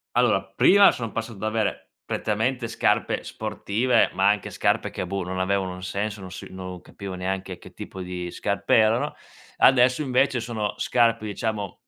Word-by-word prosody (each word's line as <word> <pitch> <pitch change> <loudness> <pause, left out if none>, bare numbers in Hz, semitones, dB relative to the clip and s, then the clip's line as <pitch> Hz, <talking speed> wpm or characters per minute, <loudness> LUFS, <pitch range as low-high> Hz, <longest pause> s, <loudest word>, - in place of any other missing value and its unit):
Allora, - - +3
prima 200 +1 +7
son 115 -3 -5
passato 115 -2 -5
ad 100 - -9
avere 110 -1 -2
prettamente 115 +3 -1
scarpe - - 0
sportive 110 +3 0
ma 95 +1 +3
anche 105 -1 0
scarpe - - 0
che, 90 - -4
boh, 95 0 -2
non 95 +1 -4
avevano 95 0 0
un 90 - -9
senso 100 +2 -3
non 95 - -8
si 90 - -8
non 95 -1 -7
capivo 100 -2 -8
neanche 95 0 -4
che - - -14
tipo 95 - -9
di 90 -1 -5
scarpe - - 0
erano, 110 +2 +3 0.4
adesso 130 +2 +5
invece 130 0 +2
sono 110 -3 -3
scarpe 115 -2 +2
diciamo 105 -1 -3
105 Hz, 165 wpm, -24 LUFS, 95-115 Hz, 0.4 s, prima